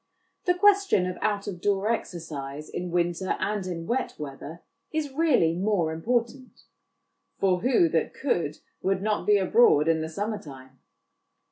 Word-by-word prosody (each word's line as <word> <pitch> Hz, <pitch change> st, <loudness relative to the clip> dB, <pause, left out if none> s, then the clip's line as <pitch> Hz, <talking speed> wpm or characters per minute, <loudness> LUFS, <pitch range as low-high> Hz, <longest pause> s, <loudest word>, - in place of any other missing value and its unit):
The 360 Hz, -1 st, +3 dB
question 395 Hz, -, +4 dB
of 180 Hz, 0 st, -4 dB
out 205 Hz, -2 st, 0 dB
of 180 Hz, -4 st, -6 dB
door 205 Hz, +2 st, +1 dB
exercise 150 Hz, -8 st, -5 dB
in 180 Hz, 0 st, -4 dB
winter 175 Hz, +1 st, 0 dB
and 205 Hz, -2 st, -2 dB
in 165 Hz, -2 st, -5 dB
wet 255 Hz, +7 st, -2 dB
weather 150 Hz, +3 st, -8 dB, 0.3 s
is 310 Hz, -3 st, -2 dB
really 270 Hz, -, +3 dB
more 180 Hz, -3 st, 0 dB
important; 240 Hz, +8 st, -2 dB, 0.7 s
for 185 Hz, -2 st, +2 dB
who 235 Hz, -5 st, +3 dB
that 160 Hz, 0 st, 0 dB
could 170 Hz, -, -1 dB, 0.2 s
would 190 Hz, 0 st, 0 dB
not 210 Hz, -1 st, -1 dB
be 210 Hz, -1 st, +6 dB
abroad 190 Hz, -6 st, +4 dB
in 165 Hz, -1 st, +2 dB
the 160 Hz, -, -4 dB
summer 205 Hz, +5 st, -3 dB
time? 130 Hz, -4 st, -13 dB
190 Hz, 150 wpm, -26 LUFS, 165-225 Hz, 0.7 s, be